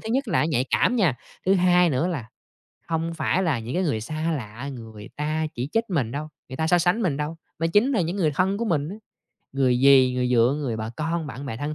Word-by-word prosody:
thứ 220 - -7
nhất 265 -1 0
là - - +2
nó - - +2
nhạy 130 -3 +1
cảm 250 - +2
nha, 180 - +3 0.3
thứ 190 - +5
hai 180 -1 +4
nữa 135 +5 0
là 140 -11 -4 0.6
hông 165 0 -1
phải 165 +3 0
là 160 -8 +1
những 115 +3 -6
cái 185 - +1
người 115 -9 0
xa 155 +8 -2
lạ 120 +2 -7
người 110 -4 -10
ta 155 +1 -1
chỉ 125 +3 -3
trích 225 0 +2
mình 140 -11 0
đâu, 150 +2 -4 0.2
người 130 - -7
ta 160 - 0
so 175 +2 +4
sánh 175 +7 +2
mình 165 -9 0
đâu, 150 +3 -3 0.2
mà 165 - +2
chính 205 +11 +3
là 225 - +2
những 170 +2 -1
người 170 -6 +2
thân 190 +4 +1
của 235 - -1
mình 150 -7 0
đó. 200 - -7 0.6
Người 130 -2 +2
dì, 135 -2 +6
người 125 -1 0
dượng, 125 +3 +3
người 125 -6 -2
bà 110 0 -4
con, 160 +1 -2
bạn 140 0 -7
bè 115 -4 -4
thân 145 +4 -3
155 Hz, 255 wpm, -24 LUFS, 130-175 Hz, 0.6 s, dì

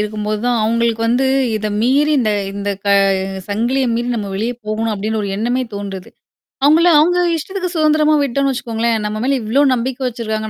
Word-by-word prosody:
இருக்கும்போது 210 0 -2
தான் 240 -2 +1
அவங்களுக்கு 230 0 0
வந்து 250 +3 +2 0.3
இத 215 0 -3
மீறி 285 +6 +2
இந்த, 215 -4 +1 0.2
இந்த 200 0 -3
க - - -1 0.6
சங்கிலியை 240 +6 0
மீறி 240 +1 -2
நம்ம 205 -2 -4
வெளிய 225 +5 -2
போகணும் 220 +1 -1
அப்படினு 215 +2 -2
ஒரு 200 - -3
எண்ணமே 245 +4 0
தோன்றுது. 195 -2 -7 0.6
அவங்கள 325 +4 +5
அவங்க 355 +3 +3 0.2
இஷ்டத்துக்கு 370 +3 -4
சுதந்திரமா 310 -1 +3
விட்டோம்னு 275 +1 0
வச்சுக்கோங்களேன், 230 -2 -1
நம்ம 215 +1 -3
மேல 270 +1 +1
இவ்ளோ 230 +7 +1
நம்பிக்கை 255 +2 -3
வச்சிருக்காங்க, 220 -2 -4
235 Hz, 165 wpm, -17 LUFS, 215-270 Hz, 0.6 s, அவங்கள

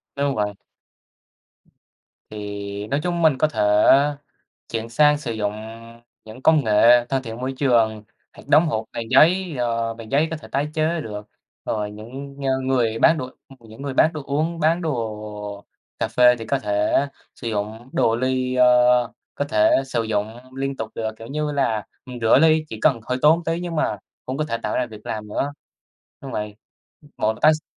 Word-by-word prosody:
Đúng 140 -1 0
vậy. 105 -1 -1 1.8
Thì 100 -1 -6
nói 140 +6 -1
chung 175 -1 -1
mình 155 -5 +4
có 155 - +3
thể 110 -7 -2 1.1
chuyển 115 0 -3
sang 150 +5 +4
sử 125 -6 -4
dụng 105 -2 -2 0.7
những 110 +4 -12
công 155 -3 +4
nghệ 120 +3 +5
thân 135 -1 -1
thiện 115 -2 -7
môi 130 +1 -3
trường, 115 -5 +2 0.3
hoặc - - -15
đóng 155 +3 +5
hộp 110 -7 -1
bằng 115 -1 -5
giấy, 175 -1 +4
ờ, 115 -1 -1
bằng 115 -1 -11
giấy 150 +3 +3
có 160 - -3
thể 155 - -12
tái 140 +2 0
chế 160 +1 0
được, 105 -4 -7 0.4
rồi 105 -1 -2
những 130 +7 -9
ng 130 -1 -1
người 115 -4 +1
bán 165 +4 +5
đồ 130 0 -5 0.3
những 115 +2 -13
người 140 -2 -4
bán 160 - +4
đồ 155 -3 -6
uống, 155 +4 -1
bán 165 +3 +2
đồ 105 -7 -5 0.3
cà - - -1
phê 125 0 +5
thì 115 - -7
có 140 - 0
thể 105 +4 +1 0.3
sử 120 - -6
dụng 110 +3 -4
đồ 115 0 +2
ly, 130 0 -1
ờ, 125 -1 +4 0.2
có 145 - -1
thể 105 -7 +3 0.2
sử 120 -3 -1
dụng 110 0 -2 0.2
liên 135 0 -2
tục 110 -1 -4
được, 110 -1 -2
kiểu 115 - -9
như 150 +2 -2
là, 115 -7 0 0.2
ừm, 125 -1 -8
rửa 115 +3 +5
ly 160 0 +4
chỉ 110 - -7
cần 135 -7 +3
hơi 125 0 0
tốn 155 +2 +6
một 170 - -7
tý 165 +1 -1
nhưng 175 -2 -4
mà 105 -8 0 0.3
cũng 130 - -3
có 155 - 0
thể 115 - -1
tạo 105 - -2
ra 125 - 0
việc 110 -2 -13
làm 105 -1 -5
nữa. 140 +7 -2 0.7
Đúng - - -8
vậy, 105 -1 -4 0.6
một 110 +1 +1
là - - -14
tái 155 +1 +6
s 155 - -5
125 Hz, 195 wpm, -22 LUFS, 110-145 Hz, 1.8 s, tốn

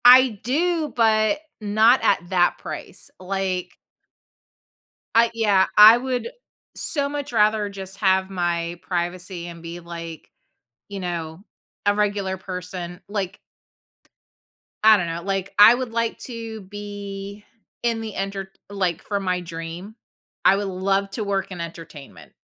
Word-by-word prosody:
I 250 -3 +8
do, 315 +4 0
but 220 +3 +3 0.2
not 220 +4 +4
at 175 -3 +2
that 175 -2 +3
price, - - -8
like 185 -1 -3 1.4
I 230 0 +5
Yeah, 205 -4 +3
I 215 +2 +10
would 255 - -2 0.5
so 285 -3 0
much 285 -3 -5
rather 215 -1 +3
just 195 -1 -8
have 190 -2 +2
my 175 -2 -2
privacy 175 0 -3
and 170 -1 -9
be, 170 +1 -7
like, 170 -2 -8 0.6
you 200 -1 -6
know, 170 -1 -5 0.4
a 205 0 +3
regular 200 -2 0
person, 180 -1 -6
like 200 -3 -3 1.4
I 215 0 +8
don't 180 - -1
know, 165 +1 -4
like, 195 0 -2
I 220 +3 +10
would 250 -2 -4
like 230 0 -1
to 225 -3 -7
be 200 0 -8 0.4
in 230 -1 0
the 220 -2 -6
entert 195 0 -3 0.2
like, 190 -5 -1
for 200 -1 -2
my 185 -2 -1
dream, 170 +4 -7 0.5
I 195 - +6
would 200 0 -2
love 195 +1 0
to 215 - -3
work 195 -1 -2
in 180 -2 -6
entertainment, 165 -4 -10
195 Hz, 135 wpm, -23 LUFS, 180-220 Hz, 1.4 s, I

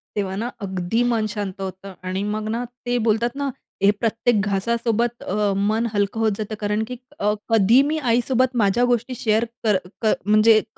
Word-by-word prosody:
तेव्हा 195 -2 -2
ना 225 +5 -2
अगदी 190 +3 -1
मन 230 -3 +1
शांत 200 -3 -4
होतं 190 +1 -6
आणि 185 +2 -2
मग 210 +1 -2
ना, 230 +2 -1 0.2
ते 245 0 +1
बोलतात 230 +1 +1
ना 280 0 -1 0.3
हे 200 - +5
प्रत्येक 230 0 +1
घासासोबत 235 +3 0
अ, 205 0 0
मन 215 +4 +1
हलकं 205 +1 0
होत 220 -1 +3
जातं 215 0 -4
कारण, 210 +1 0
की 250 - -5 0.2
अ, 210 +1 +2 0.2
कधी 225 +3 +5
मी 305 +2 0
आईसोबत 255 -1 +1
माझ्या 205 +4 +3
गोष्टी 245 +1 0
शेअर 220 -1 +1 0.8
म्हणजे 215 +1 +6
क - - -17
220 Hz, 175 wpm, -22 LUFS, 205-235 Hz, 0.8 s, म्हणजे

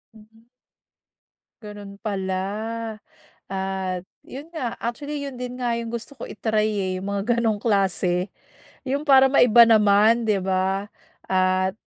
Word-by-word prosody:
Mm. 220 +1 -20 1.2
Gano'n 205 -1 -10
pala, 190 -3 -2 1.2
at 190 -1 -3 0.2
'yon 285 +5 -10
nga 255 -8 -4
actually, 285 +5 -4
'yon 270 -3 -6
din 250 0 -5
nga 240 -1 0
'yong 230 0 -5
gusto 235 +4 -6
ko - - -6
i-try 215 -1 0
eh, 200 -3 -2
'yong 190 - -7
mga 200 0 -1 0.2
ganong 225 -3 +1
klase, 190 -3 +1 0.6
'yong 285 +3 -2
para 270 -1 +7
maiba 240 -3 +7
naman, 215 +2 +4
'di 205 -2 +2
ba. 190 +1 0 0.4
At, 185 0 +2
210 Hz, 130 wpm, -23 LUFS, 190-235 Hz, 1.2 s, para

